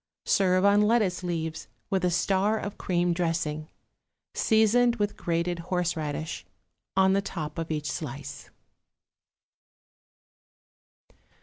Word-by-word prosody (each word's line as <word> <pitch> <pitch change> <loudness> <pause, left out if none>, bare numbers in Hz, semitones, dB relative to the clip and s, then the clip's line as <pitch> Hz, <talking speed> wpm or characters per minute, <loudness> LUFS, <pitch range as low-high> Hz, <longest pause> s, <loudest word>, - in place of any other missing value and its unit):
Serve 185 -1 +3
on 200 +1 +5
lettuce 210 -5 +2
leaves 160 -6 -3 0.2
with 190 -1 +1
a 180 - +3
star 195 +4 +2
of 205 -1 -5
cream 175 -1 +1
dressing, 165 -3 -2 0.6
seasoned 230 +2 +3
with 205 -2 -1
grated 170 +1 -1
horseradish, 165 -3 -2 0.5
on 190 0 +5
the 195 - +2
top 165 -5 -5
of 165 - -4
each 150 -2 -2
slice. 140 -1 -6
180 Hz, 105 wpm, -27 LUFS, 160-200 Hz, 0.6 s, on